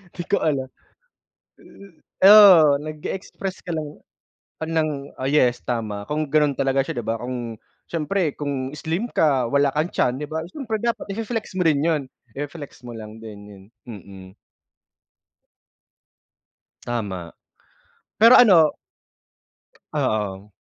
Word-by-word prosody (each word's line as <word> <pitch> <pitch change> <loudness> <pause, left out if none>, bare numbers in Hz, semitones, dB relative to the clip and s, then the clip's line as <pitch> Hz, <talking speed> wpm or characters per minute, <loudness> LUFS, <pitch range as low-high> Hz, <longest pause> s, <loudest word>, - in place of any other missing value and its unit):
'di 175 - -5
ko 200 - +3
alam. 135 -4 -1 1.5
Eh, 190 - +5
oo 185 -9 +8
nag-e-express 185 +5 -6
ka 175 - -8
lang 155 -2 -3 0.8
ng 155 -4 -2
oh, 130 - -6
yes 125 -5 +2
tama 110 -4 -3
kung 155 0 -1
gano'n 150 -2 +1
talaga 135 0 +1
siya 125 - -5
'di 115 - -5
ba 115 0 -1
kung 120 -2 -5 0.3
siyempre 170 0 -1
kung 140 -1 -4
slim 165 +10 -3
ka 135 -6 +2
wala 140 +1 +2
kang 155 +3 0
tiyan 125 - +2
'di 150 - -4
ba 160 0 -3
siyempre 245 -5 -4
dapat 235 -1 -2
i-fe-flex 225 -2 -4
mo 185 - 0
rin 150 -3 +3
'yun, 160 -3 +1 0.3
i-flex 145 -1 -8
mo 120 - -7
lang 110 +1 -10
din 110 -2 -9
'yun, 100 -2 -14 0.2
mm. 95 -4 -11 2.5
Tama, 100 -8 -4 0.8
pero 230 +4 +8
ano 175 -11 +6 1.2
Oo. 105 -1 -2
145 Hz, 130 wpm, -22 LUFS, 120-165 Hz, 2.5 s, oo